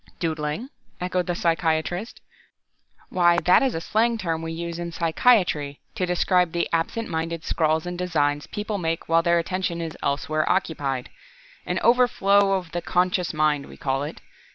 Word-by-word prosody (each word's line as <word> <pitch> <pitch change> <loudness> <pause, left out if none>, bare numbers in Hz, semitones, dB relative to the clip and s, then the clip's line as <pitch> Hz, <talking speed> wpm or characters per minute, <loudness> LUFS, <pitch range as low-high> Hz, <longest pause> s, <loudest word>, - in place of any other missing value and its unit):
"Doodling?" 160 - -2 0.3
echoed 180 0 -1
the 175 - -1
psychiatrist. 170 +4 -1 0.9
"Why 175 -1 +4
that 180 - +6
is 265 -2 +1
a 165 - -3
slang 230 +5 +1
term 165 -6 -2
we 165 0 -4
use 170 +1 -5
in 170 0 -4
psychiatry, 165 -4 +2
to 180 - -2
describe 180 -1 +2
the 170 - 0
absent 165 +7 -1
minded 165 0 -3
scrawls 160 0 +1
and 175 0 -5
designs 145 -5 0
people 210 0 -4
make 165 -1 -2
while 165 0 +4
their 170 0 +3
attention 175 0 -2
is 165 -2 -5
elsewhere 155 +2 0
occupied. 140 -8 -1 0.6
An - - -1
overflow 200 -5 +4
of 180 -3 -2
the 175 - -2
unconscious 180 0 0
mind, 150 -2 +1
we - - -13
call 135 0 -1
it. 150 +2 -6
170 Hz, 160 wpm, -24 LUFS, 160-185 Hz, 0.9 s, that